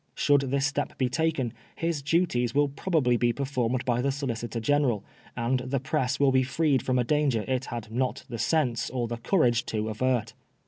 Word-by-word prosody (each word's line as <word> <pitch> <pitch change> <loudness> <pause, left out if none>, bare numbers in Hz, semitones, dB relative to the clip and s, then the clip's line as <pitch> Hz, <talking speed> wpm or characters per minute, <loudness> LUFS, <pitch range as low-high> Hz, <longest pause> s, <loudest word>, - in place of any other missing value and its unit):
Should 145 -1 +3
this 135 0 0
step 145 +1 -2
be 130 -2 +1
taken, 145 -4 0 0.2
his 165 -3 -1
duties 140 -5 +1
will 145 0 +3
probably 140 -4 +1
be 120 0 +2
performed 130 -2 -1
by 120 -1 +1
the 140 +2 +1
Solicitor 120 -4 -3
General, 125 -4 +1 0.3
and 125 +2 +1
the 130 +2 -2
press 140 -2 -1
will 140 -1 +4
be 130 0 +4
freed 135 +1 +1
from 130 -1 0
a 125 - +3
danger 135 -4 +1
it 130 -1 -1
had 115 -2 -6
not 125 +2 -1
the 115 - -6
sense 130 -7 +1
or 120 -2 -2
the 120 0 -4
courage 120 - +2
to 110 0 -2
avert. 115 0 0
130 Hz, 190 wpm, -27 LUFS, 120-145 Hz, 0.3 s, will